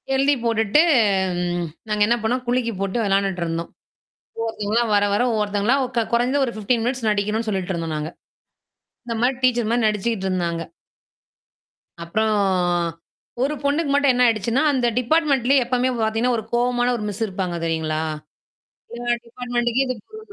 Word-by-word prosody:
எழுதி 275 +2 +3
போட்டுட்டு 225 +4 +3 0.7
ம். 175 -1 -2 0.2
நாங்க 210 0 -1
என்ன 235 - +3
பண்ணோம் 250 +3 0
குலுக்கி 245 -1 +1
போட்டு 195 +2 -1
விளையாண்டுட்டுருந்தோம். 180 -4 -1 0.7
ஒவ்ஒருத்தவங்களா, 225 0 0
வர 205 0 +4
வர 205 - +2
ஒவ்வொருத்தவங்களா 210 +3 +1 0.2
க 230 - +2
குறைஞ்ச 245 +3 +2
ஒரு 235 - -4
15 225 +2 0
மினிட்ஸ் 245 -1 -1
நடிக்கணும்னு 210 +2 -1
சொல்லிட்டு 190 -2 -2
இருந்தோம் 165 -2 -3
நாங்க. 150 +1 -4 1.0
இந்த 230 -1 -3
மாரி 255 +1 +2
டீச்சர் 240 -3 +2
மாரி 235 0 +1
நடிச்சுக்கிட்டு 210 -1 -1
இருந்தாங்க. 170 -3 -1 1.4
அப்புறம் 215 +6 0 1.1
ஒரு 285 +3 0
பொண்ணுக்கு 285 +2 +1
மட்டும் 285 -1 +4
என்ன 250 0 +3
ஆயிடுச்சுன்னா, 230 +4 +1
அந்த 255 -3 0
டிபார்ட்மென்ட்லயே 275 -1 +2
எப்பவுமே 250 +1 +1
பார்த்தீங்கன்னா 225 +3 +1
ஒரு 220 - -4
கோவமான 245 0 +2
ஒரு 215 - -5
மிஸ் 205 +2 -3
இருப்பாங்க 185 -3 -3
தெரியுங்களா? 160 -1 -1 0.9
எல்லா 240 0 -2
டிபார்ட்மெண்டக்கே 240 +1 -1
இது 255 - -2
பொருந்தும். 435 0 -11
230 Hz, 140 wpm, -22 LUFS, 200-250 Hz, 1.4 s, வர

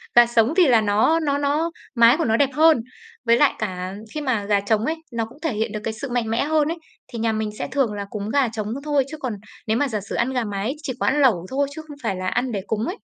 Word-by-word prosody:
gà 240 0 +9
sống 235 +4 +2
thì 350 -5 +6
là 235 -3 +5
nó 215 +11 +3
nó 285 -3 0
nó 295 +4 0 0.2
mái 235 +4 +6
của 330 - 0
nó 225 0 +2
đẹp 275 -2 +3
hơn, 310 -6 +5 0.4
với 235 +1 +5
lại 290 0 +4
cả 185 -2 -4 0.2
khi 305 - -3
mà 245 -7 0
gà 205 -1 +2
trống 215 +2 +1
ấy, 320 - 0 0.2
nó 230 -1 -1
cũng 255 +7 -16
thể 320 -8 -1
hiện 220 +1 -1
được 215 - -4
cái 220 - -2
sự 250 +4 -6
mạnh 240 -2 -1
mẽ 230 +5 +1
hơn 310 -1 +2
ấy, 335 +2 -2 0.3
thì 235 - -7
nhà 225 0 +1
mình 215 -1 -2
sẽ - - -2
thường 265 -6 +1
là 200 -1 -4
cúng 210 0 -5
gà 275 0 +2
trống 215 -2 -4 0.2
thôi, 290 -3 +1
chứ 310 - -6
còn 255 -6 -3 0.3
nếu 220 +1 +2
mà 290 - +1
giả 215 -4 -2
sử 200 - -6
ăn 255 +3 0
gà 250 -2 0
mái 205 +6 -3
chỉ 260 - -3
có - - 0
ăn 295 +2 +2
lẩu 195 -10 +3
thôi, 280 +1 0
chứ 315 - -6
không 290 -1 -10
phải 195 -5 -1
là 185 0 -4
ăn 245 +4 0
để 200 -3 -2
cúng 220 +1 -1
ấy. 375 +6 -4
235 Hz, 290 wpm, -22 LUFS, 215-285 Hz, 0.4 s, gà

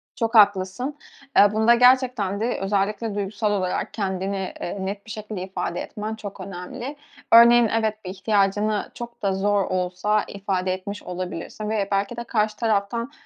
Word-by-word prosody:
Çok 230 0 -1
haklısın. 205 +7 +3 0.4
Eee, 205 0 +7
bunda 220 +2 +5
gerçekten 250 -5 +3
de 235 +3 -1
özellikle 205 +2 -1
duygusal 205 +1 -1
olarak 185 -3 -1
kendini, 190 -1 -3
eee, 175 - -4
net 200 +1 -5
bir 220 - -9
şekilde 215 -3 -6
ifade 180 -2 -4
etmen 215 +1 -5
çok 205 -2 -8
önemli. 195 +9 -7 0.4
Örneğin, 235 0 +8
evet, 215 -2 -2
bir 185 - -4
ihtiyacını 205 +1 0
çok 235 0 -9
da 195 -2 +1
zor 200 +1 +1
olsa 185 +3 0
ifade 190 -2 -2
etmiş 200 +2 -6
olabilirsin. 180 +3 -5
Ve 205 -3 0
belki 200 +4 0
de 235 - -3
karşı 215 -2 0
taraftan 230 +3 -1
205 Hz, 155 wpm, -23 LUFS, 195-220 Hz, 0.4 s, Örneğin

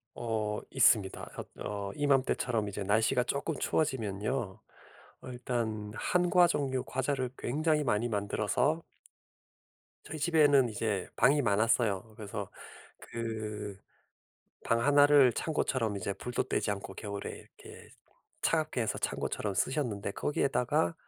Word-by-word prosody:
어 110 -2 -2
있습니다. 110 -7 +3
엇 - - -6
어 100 -1 -4
이맘때처럼 130 -6 +1
이제 100 0 -4
날씨가 110 +5 +2
쪼끔 140 +5 -2
추워지면요 110 -6 -1 0.6
어 - - -9
일단 115 -4 -3
한과 180 0 +3
종류 135 -5 -1
과자를 130 -1 -1
굉장히 150 +3 0
많이 120 0 +1
만들어서 105 +9 0 1.2
저희 155 - -6
집에는 145 -5 +4
이제 105 -3 -2
방이 140 +5 +4
많았어요. 110 -1 +1
그래서 100 -2 -6 0.5
그 110 -3 -5 0.9
방 115 0 +1
1 145 +2 +6
를 140 -4 +6
창고처럼 130 -9 -1
이제 100 +1 -3
불도 120 +5 -3
때지 110 -5 -1
않고 100 -1 -6
겨울에 100 -2 -5
이렇게 - - -13 0.5
차갑게 155 -6 +1
해서 110 - -1
창고처럼 105 -2 -2
쓰셨는데 105 -3 -1
거기에다가 125 -9 0
115 Hz, 280 characters per minute, -31 LUFS, 105-140 Hz, 1.2 s, 1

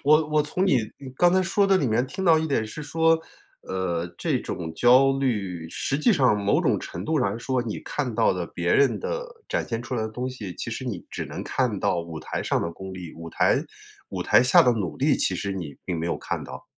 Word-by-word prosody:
我 155 +2 +5
我 150 0 +3
从 180 +6 -1
你 135 -9 +4 0.2
你 135 -2 -9
刚 175 0 +5
才 185 0 +4
说 195 +2 +2
的 195 -1 +4
里 140 - +1
面 120 +3 +1
听 190 +6 -5
到 165 -2 +6
一 160 - -1
点 115 -7 0
是 150 +8 -7
说， 160 +2 +2 0.4
呃， 90 -2 -2
这 - - 0
种 80 -2 -5
焦 130 +6 +5
虑， 95 -11 -2
实 140 - -2
际 190 - +3
上 130 - +3
某 100 - +3
种 - - +1
程 - - -6
度 155 -3 +1
上 100 - +1
来 110 - -4
说， 130 +1 -1
你 110 -3 -4
看 130 -6 -3
到 115 -3 +3
的 90 -2 -3
别 85 0 -1
人 140 - +3
的 - - -3 0.2
展 - - -1
现 115 0 -3
出 125 - -5
来 120 - -1
的 110 - -2
东 125 +4 -4
西， 105 -8 -7
其 115 - -5
实 130 +3 -5
你 100 -8 -4
只 - - -4
能 - - -6
看 120 -7 0
到 85 - +1
舞 85 -2 -7
台 - - -4
上 - - 0
的 85 - -2
功 95 +2 -8
力。 90 -3 -8
舞 85 0 -9
台 - - +2 0.5
舞 - - -4
台 - - +5
下 130 - +6
的 125 - +4
努 95 -8 -3
力， - - +2
其 - - +1
实 100 -1 -3
你 80 -7 -6
并 85 -3 -2
没 85 - -2
有 - - -1
看 - - -4
到。 - - -9
120 Hz, 270 characters per minute, -25 LUFS, 95-150 Hz, 0.5 s, 到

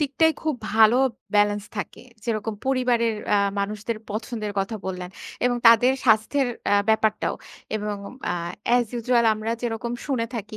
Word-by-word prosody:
দিকটাই 300 +2 +3
খুব 310 -3 0 0.2
ভালো 220 +2 +6 0.4
ব্যালেন্স 205 0 +3
থাকে। 205 - -5 0.2
যেরকম 220 -1 -2
পরিবারের 245 -4 +1 0.2
আ - - +5 0.2
মানুষদের 210 +3 -2
পছন্দের 215 0 -4
কথা 195 +3 -1
বললেন 180 -1 -5 0.3
এবং 245 0 +2
তাদের 230 +3 +7
স্বাস্থ্যের 240 +4 +3 0.2
আ - - +6
ব্যাপারটাও। 220 -1 +2 0.4
এবং 210 -1 -3 0.3
আ - - +1 0.4
এস 245 - +3
ইউজুয়াল 240 0 +2
আমরা 215 +1 -4
যেরকম 235 0 -3
শুনে 255 -5 0
থাকি 215 -1 -5
225 Hz, 140 wpm, -24 LUFS, 210-245 Hz, 0.4 s, তাদের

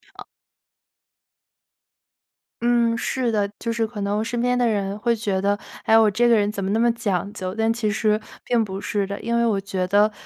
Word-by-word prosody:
哦 - - -10 2.4
嗯， 235 -1 +2
是 245 0 -1
的， 205 -2 0
就 230 - -3
是 230 -1 0
可 215 -2 -7
能 200 +1 -1
我 - - 0
身 235 +1 -2
边 250 0 +1
的 245 -1 +2
人 200 -2 -1
会 235 +1 +1
觉 205 -4 -1
得， 200 +1 +1 0.3
哎， 220 - +6
我 220 -2 +5
这 240 +4 +2
个 235 - +5
人 205 -1 +1
怎 200 - -5
么 190 - -2
那 220 - +1
么 235 0 +4
讲 205 -4 -2
究， 185 0 -5
但 225 0 +1
其 230 -2 -1
实 215 0 +1 0.2
并 235 -2 +1
不 195 0 -6
是 200 -2 -1
的。 200 +1 -4
因 235 0 -1
为 235 - +2
我 205 -4 +1
觉 190 -2 -2
得， 205 +3 +4
215 Hz, 230 characters per minute, -23 LUFS, 200-235 Hz, 2.4 s, 哎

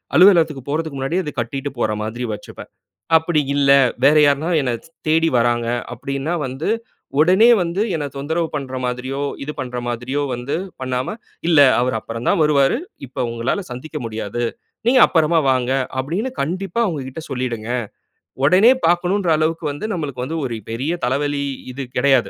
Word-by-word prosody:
அலுவலகத்துக்கு 165 -5 +5
போறதுக்கு 155 -1 -2
முன்னாடியே 160 +8 -1
அத 150 - -4
கட்டிட்டு 135 +4 -3
போற 110 - +1
மாதிரி 115 +3 -4
வச்சுப்பேன். 105 - -10 0.5
அப்படி 160 0 0 0.2
இல்ல, 140 -1 +2 0.4
வேற 145 +2 +6
யாருன்னா 145 +4 +2
என்ன 130 -3 -1
ச் - - -18 0.2
தேடி 160 +1 +3
வர்றாங்க 120 0 +1 0.3
அப்டின்னா 140 +5 -3
வந்து, 135 +7 -3 0.5
உடனே 185 +9 +6
வந்து 175 +3 -1
என்ன 150 -2 -2
தொந்தரவு 160 +4 -1
பண்ற 130 -3 -4
மாதிரியோ, 125 +3 -3 0.2
இது 150 - -3
பண்ற 125 -1 -4
மாதிரியோ 120 +4 -2
வந்து 125 +3 -3 0.3
பண்ணாம, 130 +7 -2 0.3
இல்ல 160 -3 +5 0.2
அவரு 125 -1 0
அப்புறம் 115 +2 -6
தான் - - +2
வருவாரு. 140 -3 +3 0.3
இப்போ 125 - -5
உங்களால 120 - -1
சந்திக்க 150 +5 -6
முடியாது. 110 +1 -4 0.4
நீங்க 255 +1 +5
அப்பறமா 160 0 +3
வாங்க, 130 -1 0 0.3
அப்டின்னு 180 - -2
கண்டிப்பா 185 +7 -2
அவங்ககிட்ட 145 - -4
சொல்லிடுங்க. 120 -3 -3 0.7
ஒடனே 185 - +6
பாக்கனுன்ற 175 +2 +2
அளவுக்கு 160 +1 -1
வந்து 145 +8 -6
நம்மளுக்கு 140 -8 -4
வந்து 160 +4 -4
ஒரு 120 -3 -3 0.2
பெரிய 130 +9 -2
தலைவலி 140 +2 0 0.3
இது 135 +2 -5
கெடையாது. 130 -7 +3
140 Hz, 150 wpm, -20 LUFS, 125-165 Hz, 0.7 s, வேற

